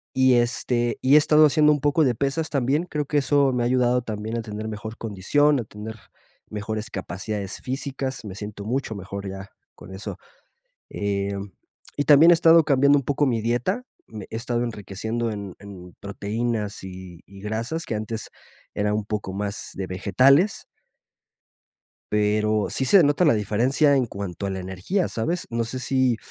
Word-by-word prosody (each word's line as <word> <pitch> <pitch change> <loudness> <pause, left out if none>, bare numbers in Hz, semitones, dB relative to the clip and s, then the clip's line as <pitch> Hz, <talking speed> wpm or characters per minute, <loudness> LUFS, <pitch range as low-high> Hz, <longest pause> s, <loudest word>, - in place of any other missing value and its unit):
Y, 130 -1 +5
este, 120 0 0
y 135 +2 +5
he - - +10
estado 150 +1 +5
haciendo 150 +1 +4
un 145 - 0
poco 145 +3 +3
de 125 -3 +2
pesas 140 +6 -1
también, 140 +4 +1
creo 150 -4 -3
que 145 +1 0
eso 140 -1 +3
me 125 -1 0
ha - - +1
ayudado 125 0 +2
también 110 0 -4
a - - -3
tener 110 0 -6
mejor 110 +1 -6
condición, 130 +8 +1
a - - -5
tener 110 +1 -8 0.5
mejores 110 +2 -4
capacidades 100 +1 -5
físicas, 135 -1 -4
me 100 -3 -7
siento 105 0 -7
mucho 120 +1 -2
mejor 100 0 -6
ya 95 0 -8 0.2
con 95 - -12
eso. 95 - -6 0.7
Em, 100 -1 -3 0.4
y 145 - 0
también 150 +3 +7
he - - +8
estado 165 -1 +6
cambiando 140 0 +4
un 140 - -4
poco 145 +2 +1
mi 115 -3 +1
dieta, 120 - 0 0.2
me 105 -3 -9
he - - -4
estado 120 +1 -2
enriqueciendo 110 +1 -3
en 100 -3 -6
en 95 -3 -11
proteínas 105 +1 -3
y 90 -2 -10
y 100 +1 -14
grasas, 115 +10 -3
que - - -4
antes 110 +1 -5 0.4
era 105 0 0
un 105 0 -1
poco 105 -2 -4
más 100 0 -4
de 95 - -4
vegetales. 130 - +3 1.5
Pero 105 0 +2
sí 135 - -1
se 190 +7 +7
nota 145 +4 +3
la 150 - +5
diferencia 120 +8 +2
en 130 -2 +2
cuanto 100 -3 -5
a - - -2
la 95 -1 -4
energía, 95 - -2
¿sabes?, 170 +10 -2
no 115 0 -1
sé 125 +3 -5
sí, 130 -1 +1
115 Hz, 175 wpm, -24 LUFS, 105-135 Hz, 1.5 s, he